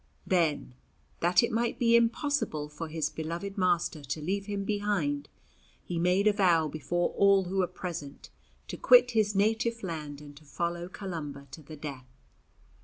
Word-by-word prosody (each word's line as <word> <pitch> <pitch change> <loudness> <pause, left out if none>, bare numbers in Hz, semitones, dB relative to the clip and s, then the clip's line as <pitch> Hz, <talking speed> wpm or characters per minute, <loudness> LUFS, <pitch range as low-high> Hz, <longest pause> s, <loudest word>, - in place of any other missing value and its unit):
Then, 155 - +1 0.5
that 175 +7 +4
it - - 0
might 230 +1 0
be 235 -1 +4
impossible 235 - +1
for 155 +2 -6
his 155 -1 -2
beloved 170 +5 -5
master 175 -5 0
to 140 +3 -4
leave 195 +6 -2
him 200 -1 -2
behind, 195 -9 -1 0.5
he 175 -2 -3
made 180 +4 +2
a 210 - +5
vow 175 -6 +3
before 175 +4 -1
all 200 -1 +4
who 185 +2 -4
were 185 -2 +2
present 165 -7 -7 0.4
to - - -5
quit - - +6
his 215 -3 +1
native 225 +3 +1
land 150 -5 -5
and 145 -1 -12
to 155 - -15
follow 170 +4 -3
Columba 155 -8 -6
to 160 - -9
the 155 +1 -11
death. 140 -4 -7
175 Hz, 165 wpm, -29 LUFS, 155-205 Hz, 0.5 s, quit